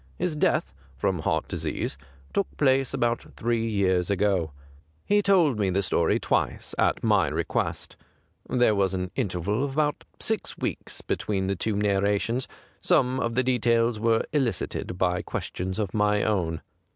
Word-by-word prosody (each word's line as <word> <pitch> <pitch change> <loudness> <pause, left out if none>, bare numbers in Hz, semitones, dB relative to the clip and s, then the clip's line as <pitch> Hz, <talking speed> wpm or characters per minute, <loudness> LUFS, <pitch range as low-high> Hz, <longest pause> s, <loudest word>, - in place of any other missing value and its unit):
His 175 -3 -1
death, 150 - +1 0.2
from 90 +6 0
heart - - 0
disease, - - -3 0.4
took 200 - +1
place 135 -2 +3
about 120 0 0
three 115 0 0
years 95 -4 +1
ago. 95 -5 +1 0.5
He 205 0 +3
told 175 - +3
me 100 -2 +2
the 95 +2 +1
story 85 -3 +2
twice, - - -1
at - - +2
my - - +3
request - - -2 0.5
j - - -1
there 120 -3 +5
was 95 -2 +1
an 90 -1 -3
interval 105 0 -1
of 140 -1 -2
about 150 0 0 0.2
six 220 -2 -2
weeks - - -4
between 95 -3 -1
the 100 +1 0
two 105 +3 -1
narrations; 105 +4 +1 0.3
some 130 +1 +2
of 115 0 -1
the 130 - +3
details 115 -2 +2
were 115 0 +2
elicited 115 - -1
by 90 -1 +1
questions 95 +1 -4
of 105 -4 -2
my 105 -1 +2
own. 85 -6 0
105 Hz, 155 wpm, -26 LUFS, 95-125 Hz, 0.5 s, there